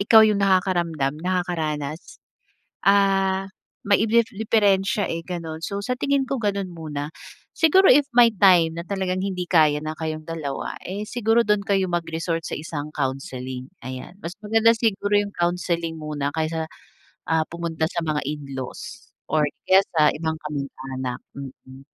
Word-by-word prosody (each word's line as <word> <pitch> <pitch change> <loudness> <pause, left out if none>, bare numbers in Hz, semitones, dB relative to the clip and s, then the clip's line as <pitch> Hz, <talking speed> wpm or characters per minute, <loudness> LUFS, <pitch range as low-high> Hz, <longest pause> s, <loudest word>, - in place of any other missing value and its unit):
ikaw 220 +2 +7
yung 210 -2 +2
nakakaramdam, 175 -7 +1
nakakaranas. 160 -4 -2 0.7
Ah, 195 -1 +3 0.4
may 200 0 +4
iblef 230 +1 +3
diperensiya, 205 -2 +2
eh, 165 0 -3
gano'n. 165 -2 -6
So, 200 +2 -3
sa 250 - 0
tingin 280 -1 +1
ko 270 - -1
gano'n 200 -2 0
muna, 150 -3 -5 0.4
siguro 375 +4 +5
if 290 +3 +7
may 240 -1 +7
time 175 -4 +5
na - - -3
talagang 185 -1 -2
hindi 185 -2 -3
kaya 155 -4 +5
na 155 0 -4
kayong 155 -1 -4
dalawa, 155 -5 -4
eh, 200 +3 -4
siguro 235 0 +2
do'n 210 -1 +2
kayo 195 -2 +2
mag-resort 165 -1 -2
sa - - -3
isang 150 -1 -5
counseling, 130 -1 -4 0.2
ayan. 130 +6 -7
Mas 170 +3 -5
maganda 225 +2 +4
siguro 210 -3 0
yung 205 0 -1
counseling 170 -1 -1
muna 150 -2 -3
kaysa, 160 0 -1 0.6
ah, 160 -1 +3
pumunta 170 -2 -3
sa - - -2
mga 155 -2 -1
in-laws, 140 -3 -7 0.2
or 155 -1 +3 0.2
kaya 190 +1 +7
sa 150 -1 +5
ibang 160 0 -2
kamag-anak, 130 -3 -5 0.2
mm. 135 0 -10
170 Hz, 145 wpm, -23 LUFS, 150-200 Hz, 0.7 s, ikaw